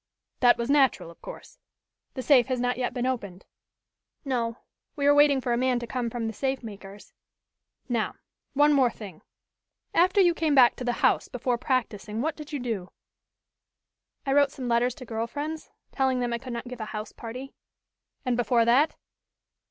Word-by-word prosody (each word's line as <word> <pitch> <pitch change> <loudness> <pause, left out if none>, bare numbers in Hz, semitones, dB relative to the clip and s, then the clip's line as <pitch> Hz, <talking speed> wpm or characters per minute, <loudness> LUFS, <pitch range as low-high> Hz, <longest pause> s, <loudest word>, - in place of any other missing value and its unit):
"That 245 -1 +5
was 235 - -2
natural, 270 - +3
of 170 - -20
course. - - -11 0.6
The 260 - -4
safe 260 -4 +5
has 255 -1 -1
not 245 0 0
yet 250 - -1
been 245 -1 -2
opened?" 200 -8 -4 0.8
"No, 235 -3 -1 0.4
we 285 -2 -1
are 285 - +6
waiting 290 -1 +5
for 245 -2 -1
a - - +1
man 255 0 +2
to 240 - -4
come 240 0 -3
from 230 0 -4
the 225 - -3
safe 265 +3 -2
makers." 200 -2 -11 0.7
"Now, 235 -4 -1 0.4
one 295 +1 +5 0.2
thing 210 -4 -9
more. - - -27 0.7
After 365 +3 +4
you 350 -3 +5
came 320 -3 +1
back 250 -3 +6
to - - -5
the 245 - 0
house - - +2
before 245 -1 -2
practicing 225 -5 -2
what 310 +5 -1
did 300 0 -10
you 295 - -2
do?" 225 -8 -4 1.4
"I 270 - +1
wrote 285 0 +5
some 260 -2 -6
letters 240 +1 +2
to 255 - -10
girl 225 0 -3
friends, 305 +5 -5 0.2
telling 265 -2 +1
them 240 -1 -1
I 235 - -2
could 255 0 -7
not 235 +1 -5
give 245 -2 -7
a - - -3
house 215 0 -6
party." 250 +4 -8 0.7
"And 250 -1 +1
before 235 -1 +2
that?" 270 +7 +3
245 Hz, 185 wpm, -27 LUFS, 230-270 Hz, 1.4 s, are